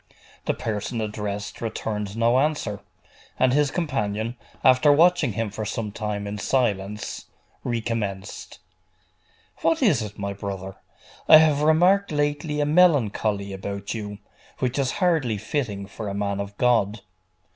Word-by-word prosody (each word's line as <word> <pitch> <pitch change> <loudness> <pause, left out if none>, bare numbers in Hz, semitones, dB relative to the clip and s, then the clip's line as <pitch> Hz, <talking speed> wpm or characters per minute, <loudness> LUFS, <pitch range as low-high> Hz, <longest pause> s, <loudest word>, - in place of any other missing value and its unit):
The - - 0
person 110 +2 -3
addressed 105 -1 -4
returned 105 -2 -3
no 120 +2 +3
answer; 140 -9 -1 0.6
and 130 -1 +3
his 145 0 +3
companion, 115 - -2 0.3
after 130 +3 +6
watching 165 - +4
him 110 0 -2
for 110 +2 -5
some 105 0 -3
time 105 -1 -3
in 105 +1 -5
silence, 105 -5 -1 0.4
recommenced 110 -4 -3 1.0
'What 325 -3 +1
is 170 - +4
it, 105 -1 -6
my 100 -1 -3
brother? 95 -1 -6 0.5
I 155 - +11
have 155 -2 +4
remarked 180 +6 +4
lately 145 0 -1
a - - +2
melancholy 115 - +2
about 100 +1 -5
you, 105 -2 -5 0.4
which 130 +1 -1
is 135 -2 0
hardly 160 - +1
fitting 105 -3 -3
for 105 +2 -7
a 100 - -4
man 100 -1 -1
of 100 0 -6
God. 115 -4 +2
110 Hz, 135 wpm, -24 LUFS, 100-145 Hz, 1.0 s, I